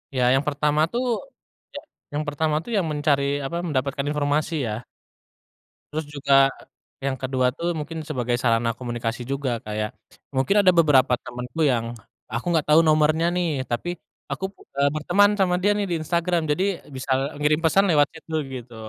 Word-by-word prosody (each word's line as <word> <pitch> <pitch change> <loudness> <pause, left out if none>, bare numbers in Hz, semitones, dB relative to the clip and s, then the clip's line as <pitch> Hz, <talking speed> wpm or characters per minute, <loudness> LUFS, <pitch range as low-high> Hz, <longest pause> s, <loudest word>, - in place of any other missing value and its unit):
Ya 125 - +2
yang 135 +2 +2
pertama 150 +1 +1
tuh, 245 +2 -1 0.7
ya - - -3 0.3
yang 150 +1 -1
pertama 150 +1 0
tuh 240 - -8
ya - - +3
mencari 145 -2 +1 0.2
apa 170 - -4
mendapatkan 140 -1 -1
informasi 150 +2 0
ya. - - -2 1.2
Terus 155 0 -2
juga 135 -1 +4 0.5
yang 135 -1 -1
kedua 130 -1 +1
tuh 170 +1 -1
mungkin 160 +2 -5
sebagai 125 -5 -1
sarana 115 -1 +2
komunikasi 120 -1 -4
juga 135 0 -2
kayak, 105 0 -2 0.5
mungkin 135 +10 +2
ada 185 -2 +6
beberapa 145 -6 +5
temenku 125 +6 -5
yang, 120 -4 +1 0.3
aku 120 +5 -4
nggak 160 -3 +1
tahu 165 - +8
nomornya 155 +1 +3
nih 165 -7 -1
tapi 175 +9 -2 0.4
aku, 190 - -2 0.3
eee, 140 0 +3
berteman 200 +7 +4
sama 180 -2 +3
dia 205 +2 +3
nih 205 - 0
di 175 - -1
Instagram 170 +1 0
jadi 180 +6 +1 0.3
bisa 130 +1 -4 0.3
ngirim 150 +1 +2
pesan 195 +5 +4
lewat 145 -2 +5
chat 160 - -14
dulu 160 -1 -1 0.2
gitu, 120 -1 -11
145 Hz, 165 wpm, -24 LUFS, 130-165 Hz, 1.2 s, tahu